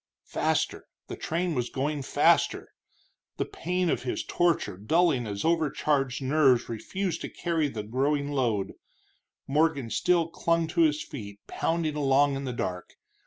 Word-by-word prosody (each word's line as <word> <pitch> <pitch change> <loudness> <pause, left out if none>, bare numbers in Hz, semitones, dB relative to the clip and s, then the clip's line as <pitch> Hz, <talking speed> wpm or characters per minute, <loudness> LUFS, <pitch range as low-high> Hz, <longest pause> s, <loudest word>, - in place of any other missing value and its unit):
Faster - - -1 0.2
the - - -4
train 170 +1 -2
was 125 -4 -1
going 145 +2 -2
faster! 130 - +2 0.7
The - - 0
pain 180 +1 -2
of - - 0
his 125 - -3
torture 170 - +1
dulling 130 - +2
as 100 -1 -4
overcharged 145 -5 +1
nerves 130 -3 +3
refused 170 - -3
to - - -5
carry 165 -3 -1
the 110 -6 -5
growing 140 +6 0
load, 115 -8 0 0.7
Morgan 140 -4 +1
still 170 +7 +2
clung 165 0 0
to 170 - +1
his 155 -2 +3
feet, 100 -6 -9
pounding 165 -2 -1
along 140 -1 +3
in 135 0 -4
the 130 - -2
dark. 90 -6 -4
145 Hz, 145 wpm, -27 LUFS, 125-165 Hz, 0.7 s, nerves